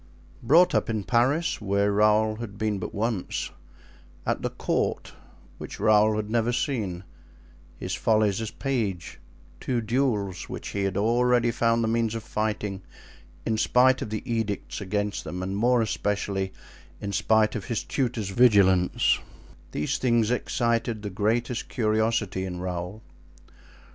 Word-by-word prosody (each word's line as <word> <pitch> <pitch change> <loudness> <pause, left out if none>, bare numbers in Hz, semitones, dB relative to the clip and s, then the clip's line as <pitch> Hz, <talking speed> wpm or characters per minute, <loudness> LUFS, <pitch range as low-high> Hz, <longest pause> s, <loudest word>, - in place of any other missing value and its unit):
Brought 170 +5 +5
up - - +1
in 110 -2 -1
Paris, 130 - +1
where 100 0 +1
Raoul 105 +1 +3
had 110 -4 -7
been 105 -2 -1
but - - -5
once; 110 -2 -2 0.7
at - - -1
the - - -1
court, - - -2 0.5
which - - -8
Raoul 110 0 +4
had 105 -1 -2
never 115 +1 +1
seen; 110 - -2 0.7
his 90 - -4
follies 110 +2 +2
as 110 - -3
page; 110 - -3 0.4
two 125 -2 -1
duels, 110 -5 -1
which - - -6
he 100 -1 -1
had 95 0 -1
already 120 +2 +3
found 115 0 +1
the - - +1
means 115 0 0
of 115 - -4
fighting, 105 -3 -2 0.6
in 110 -1 0
spite 130 +4 +4
of 125 - -4
the 110 0 -4
edicts 115 -4 -3
against 105 +1 -2
them 90 +1 -5
and, 95 +1 -3
more 120 +3 +3
especially, 100 -2 -2 0.5
in 100 - -4
spite 110 +2 +2
of 105 -4 -4
his 120 - -2
tutor's 120 -7 -2
vigilance—these 95 - +2
things 120 -3 +2
excited 115 -3 0
the 105 - -4
greatest 115 +5 -1
curiosity 110 -4 0
in 90 -1 -5
Raoul. 90 +3 -5
110 Hz, 140 wpm, -26 LUFS, 100-115 Hz, 0.7 s, Brought